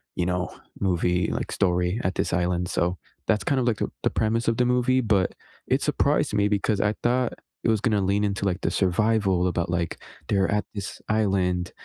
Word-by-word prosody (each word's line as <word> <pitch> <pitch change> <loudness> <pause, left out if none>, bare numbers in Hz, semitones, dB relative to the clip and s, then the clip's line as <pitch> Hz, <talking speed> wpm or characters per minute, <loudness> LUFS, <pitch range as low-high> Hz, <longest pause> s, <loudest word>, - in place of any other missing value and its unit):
you 90 - 0
know, 90 -1 -1 0.3
movie, 90 -2 +1
like, - - -3
story 90 +2 +1
at 95 - -1
this - - -1
island, 90 0 0
so 90 0 0 0.3
that's 105 -3 +2
kind 140 -2 +2
of - - 0
like 115 - +2
the - - -1
the - - +3
premise 115 +2 +1
of 115 - 0
the 125 - +3
movie, 125 +1 +2
but 105 -5 +1 0.3
it - - +2
surprised - - +1
me 100 0 +3
because 105 0 +1
I 105 - +2
thought 125 +1 +1 0.3
it - - +2
was 110 -1 +3
gonna 105 -3 +2
lean 100 +2 +1
into, 100 -1 -2
like, 95 -2 0
the - - +1
survival 95 -1 +2
about, 85 -1 -1
like 85 -2 -1 0.3
they're 95 -2 +2
at 105 0 +1
this 100 -2 -6
island 95 -5 +1
100 Hz, 205 wpm, -25 LUFS, 90-110 Hz, 0.3 s, the